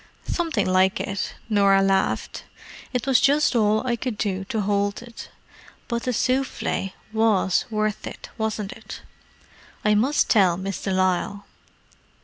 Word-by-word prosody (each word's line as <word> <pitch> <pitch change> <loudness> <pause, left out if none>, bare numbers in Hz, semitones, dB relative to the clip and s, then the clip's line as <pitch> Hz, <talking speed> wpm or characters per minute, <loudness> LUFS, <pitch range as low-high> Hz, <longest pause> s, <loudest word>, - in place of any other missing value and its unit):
"Something 325 - 0
like 185 +1 +3
it," 195 -1 -3
Norah 200 -2 +4
laughed. 195 0 0 0.5
"It 250 -1 -2
was 270 -2 +4
just 285 -1 +3
all 215 0 +2
I 240 -2 +1
could 235 -2 -4
do 195 -2 -1
to 220 +2 -2
hold 205 +1 0
it. 235 -1 -11 0.6
But 235 -1 -3
the 255 - +1
souffle 255 -6 -1 0.2
was 215 -4 +2
worth 215 -1 -2
it, - - -9
wasn't 220 -3 -3
it? - - -10 0.8
I 210 - +4
must 255 +8 +2
tell 185 -6 +4
Miss 190 +1 -4
de 195 - -2
Lisle." 185 +2 0
210 Hz, 140 wpm, -24 LUFS, 195-235 Hz, 0.8 s, Norah